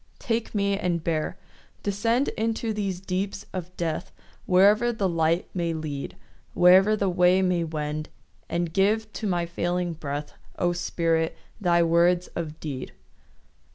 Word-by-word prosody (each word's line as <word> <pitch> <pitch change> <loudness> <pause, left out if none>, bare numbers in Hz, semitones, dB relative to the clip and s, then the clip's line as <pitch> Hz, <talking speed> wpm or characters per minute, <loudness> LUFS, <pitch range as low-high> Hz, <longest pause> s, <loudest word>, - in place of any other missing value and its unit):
Take 230 -3 -2
me 200 -1 +2
and 180 -5 -1
bear. 165 +2 -1 0.5
Descend 230 +6 +1
Into 225 0 -1
these 195 -4 -2
deeps 195 +2 -3
of 180 0 -6
death, 165 -2 -2 0.4
Wherever 205 +6 +5
the 210 -4 0
light 165 0 +1
may 170 -3 -1
lead, 150 -3 -5 0.4
Wherever 190 +4 +6
the 200 -2 0
way 180 +1 +4
may 180 -2 +1
wend; 155 -1 -3 0.4
And 170 -1 -1
give 215 +3 +1
to 220 - -3
my 175 -3 0
failing 175 +1 -1
breath, 145 -1 -5 0.2
O 175 -1 +1
Spirit, 165 -2 0 0.2
thy 170 -4 +3
words 170 +2 +3
of 160 -2 -5
deed. 135 -5 -5
180 Hz, 140 wpm, -26 LUFS, 165-200 Hz, 0.5 s, Wherever